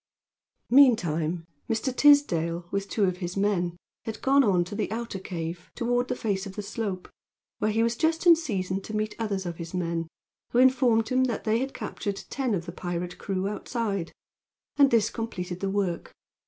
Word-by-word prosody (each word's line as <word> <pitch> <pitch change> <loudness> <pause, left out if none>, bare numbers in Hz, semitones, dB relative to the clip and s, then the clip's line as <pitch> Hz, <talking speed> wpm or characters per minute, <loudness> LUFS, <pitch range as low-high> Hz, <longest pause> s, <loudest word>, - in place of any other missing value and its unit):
Meantime 175 - +4 0.2
Mr. 240 +3 -1
Tisdale, 175 - +4
with 200 0 -2
two 215 - 0
of 185 -2 +1
his 180 0 -5
men, 180 -4 0 0.3
had 225 - -5
gone 275 +1 +5
on 185 -6 +3
to 180 +4 -9
the 210 +1 -2
outer 225 -3 -4
cave, 170 -2 -5
toward 245 +1 0
the 250 - -1
face 200 -4 -2
of 195 - -9
the 210 - -4
slope, 200 -3 -4 0.5
where 215 - +1
he 225 +1 +2
was 230 0 +1
just 320 +5 0
in 340 -1 +9
season 195 - -2
to 215 +2 -7
meet 215 0 -1
others 200 -4 -2
of 170 -1 -4
his 170 +1 -6
men, 170 -2 -1 0.5
who - - +2
informed 245 -3 +4
him 255 0 +3
that 240 -3 -2
they 220 +1 +2
had 270 +2 -3
captured 200 -2 -4
ten 260 -6 0
of 170 -2 -4
the 170 - -6
pirate 175 0 -4
crew 195 -1 -2
outside. 205 -4 -3 0.6
And 280 -1 +6
this 225 -3 +3
completed 180 -6 -4
the 195 - -1
work. 195 -4 -2
205 Hz, 185 wpm, -27 LUFS, 180-235 Hz, 0.6 s, in